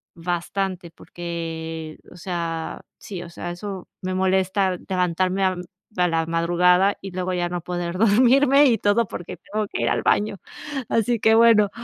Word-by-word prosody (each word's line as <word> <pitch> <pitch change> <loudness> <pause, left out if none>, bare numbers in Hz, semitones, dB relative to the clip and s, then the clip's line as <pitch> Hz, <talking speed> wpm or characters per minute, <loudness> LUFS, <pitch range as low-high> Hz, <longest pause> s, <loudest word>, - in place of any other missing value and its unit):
bastante, 175 +1 -3
porque, 165 -2 -6
o - - -13
sea, 165 -2 -4 0.2
sí, 180 -4 -7
o 170 - -10
sea, 175 +1 -6
eso 190 +1 -7
me 185 0 -3
molesta 190 0 +1
levantarme 185 +1 0
a 185 -1 +2 0.4
a 180 0 +3
la 165 -1 0
madrugada 180 +4 +3
y 195 -1 -7
luego 185 0 -2
ya 175 -1 -1
no 175 0 -3
poder 175 0 -4
dormirme 255 +7 +5
y 230 - +3
todo 220 +3 +2
porque 175 - -7
tengo 210 +1 -4
que - - -4
ir - - +1
al - - 0
baño, 205 -1 +1 0.5
así 230 0 +1
que 220 +1 +4
bueno, 225 -3 +6
185 Hz, 160 wpm, -23 LUFS, 175-200 Hz, 0.5 s, bueno